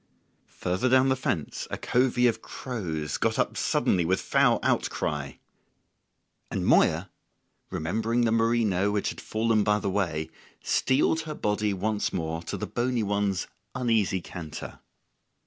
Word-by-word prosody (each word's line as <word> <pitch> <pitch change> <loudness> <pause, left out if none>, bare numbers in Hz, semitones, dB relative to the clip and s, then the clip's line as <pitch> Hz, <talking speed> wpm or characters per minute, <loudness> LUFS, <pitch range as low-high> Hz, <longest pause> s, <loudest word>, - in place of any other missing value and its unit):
Further 95 +8 -1
down 130 +1 +5
the 130 - +3
fence 95 - -3
a - - -3
covey 125 0 +2
of 115 -2 +2
crows 85 - -4
got - - +1
up - - 0
suddenly 90 - +1
with 95 +3 +1
foul - - +3
outry; 75 -2 -1 1.1
and - - -2
Moya, 85 +4 +3 0.6
remembering 110 +9 -1
the 115 -2 +2
merino 115 -4 +2
which 105 -1 0
had - - -7
fallen 110 -1 +1
by 105 0 +3
the 100 -2 -2
way, 80 -5 -1 0.3
steeled 145 +4 +2
her 150 - -4
body 105 -2 0
once 105 +2 -1
more 80 -1 -3
to 85 - -5
the - - -3
bony 120 -1 -1
one's 100 -2 0 0.3
uneasy 110 -7 +1
canter. 85 -3 -8
105 Hz, 140 wpm, -27 LUFS, 90-120 Hz, 1.1 s, down